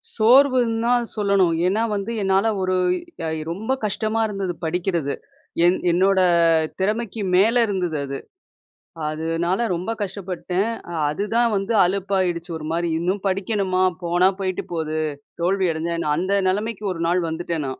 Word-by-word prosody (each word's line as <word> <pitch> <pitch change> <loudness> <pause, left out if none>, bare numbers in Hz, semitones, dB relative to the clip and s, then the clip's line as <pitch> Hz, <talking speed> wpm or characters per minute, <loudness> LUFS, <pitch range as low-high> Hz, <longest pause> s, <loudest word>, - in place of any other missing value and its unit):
சோர்வுன்தா 240 -1 +4 0.2
சொல்லணும். 200 -5 +2
ஏன்னா 205 +4 +1
வந்து, 200 +3 -3
என்னால 195 +2 +2
ஒரு 185 0 0 0.5
அ - - -1
இ - - -4
ரொம்ப 220 +7 -4
கஷ்டமா 215 +2 -1
இருந்தது 195 -3 -3
படிக்கிறது. 170 -3 -1 0.5
என் 180 +1 +4
என்னோட 190 +2 +3 0.6
திறமைக்கு 215 +2 -1
மேல 225 +6 +4
இருந்தது 180 -6 -1
அது. 135 0 -5 0.9
அதுனால, 165 +4 -1 0.2
ரொம்ப 180 +6 -3
கஷ்டப்பட்டேன். 190 0 -2 0.2
அ - - -5 0.2
அதுதான் 225 +7 +1
வந்து 195 +4 -1
அலுப்பாயிடுச்சு 185 -2 -1
ஒரு 155 - -8
மாரி, 170 0 0
இன்னும் 185 +3 -1
படிக்கணுமா? 190 -1 0 0.2
போனா 175 +2 +3
போயிட்டு 185 -1 -2
போது, 155 -1 -2 0.4
தோல்வி 190 +2 +1
அடஞ்சா 165 +2 -2
என்ன? 150 -3 0
அந்த 185 +4 0 0.2
நெலமைக்கு 210 +2 -2
ஒரு 165 - -6
நாள் 180 +1 +2
வந்துட்டேன் 160 -2 -3
நான். 130 - -6
190 Hz, 140 wpm, -22 LUFS, 170-205 Hz, 0.9 s, சோர்வுன்தா